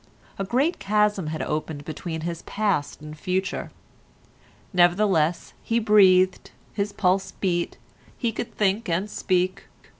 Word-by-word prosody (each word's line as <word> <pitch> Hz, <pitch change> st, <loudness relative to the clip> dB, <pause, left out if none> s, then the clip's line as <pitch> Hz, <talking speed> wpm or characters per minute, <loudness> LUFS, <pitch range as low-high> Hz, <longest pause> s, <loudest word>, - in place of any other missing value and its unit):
A -, -, 0 dB
great 260 Hz, -, +1 dB
chasm 205 Hz, -3 st, +1 dB
had 155 Hz, 0 st, -3 dB
opened 150 Hz, -1 st, -3 dB
between 160 Hz, +1 st, -5 dB
his 170 Hz, 0 st, -4 dB
past 200 Hz, -11 st, -1 dB
and 150 Hz, 0 st, -8 dB
future; 185 Hz, +5 st, -2 dB, 1.0 s
nevertheless 175 Hz, -2 st, +2 dB
he 230 Hz, -, 0 dB
breathed, 190 Hz, -4 st, +4 dB, 0.2 s
his 205 Hz, 0 st, -1 dB
pulse 190 Hz, -1 st, +1 dB
beat, 175 Hz, -3 st, -1 dB, 0.4 s
he 235 Hz, -3 st, 0 dB
could 225 Hz, -, -6 dB
think 205 Hz, +1 st, +1 dB
and 175 Hz, +5 st, 0 dB
speak. 185 Hz, -2 st, -1 dB
185 Hz, 125 wpm, -24 LUFS, 170-210 Hz, 1.0 s, breathed